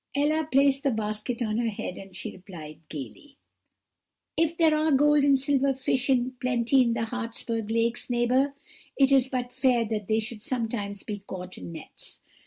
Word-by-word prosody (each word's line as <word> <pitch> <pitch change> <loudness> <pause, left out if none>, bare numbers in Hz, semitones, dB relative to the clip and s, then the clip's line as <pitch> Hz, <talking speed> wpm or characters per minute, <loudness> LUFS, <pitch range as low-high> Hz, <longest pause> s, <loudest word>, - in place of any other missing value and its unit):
"Ella 300 +2 +1
placed 275 0 +4
the 275 - +2
basket 220 +1 -2
on 215 0 -1
her 235 -1 +1
head 200 -3 -5
as 195 -1 -11
she - - -5
replied 175 -5 -10
gaily: 155 - -9 1.0
"'If 330 0 +1
there 320 -2 +5
are 310 +1 +2
gold 295 +1 +5
and 280 -1 +5
silver 275 0 +1
fish 260 0 0
in 255 -1 +2
plenty 255 +1 +3
in 235 -2 +2
the 230 - -2
Hartsberg 230 -2 -4
lakes, 230 +2 0
neighbour, 250 +3 +2 0.4
it 275 -1 +4
is 265 -1 +5
but 250 -1 -3
fair 245 -3 +2
that 210 -2 -3
they 220 0 +2
should 220 0 -5
sometimes 220 -5 -3
be 210 -2 -5
caught 185 0 -7
in - - -8
nets. 160 -2 -10
240 Hz, 180 wpm, -27 LUFS, 215-275 Hz, 1.0 s, there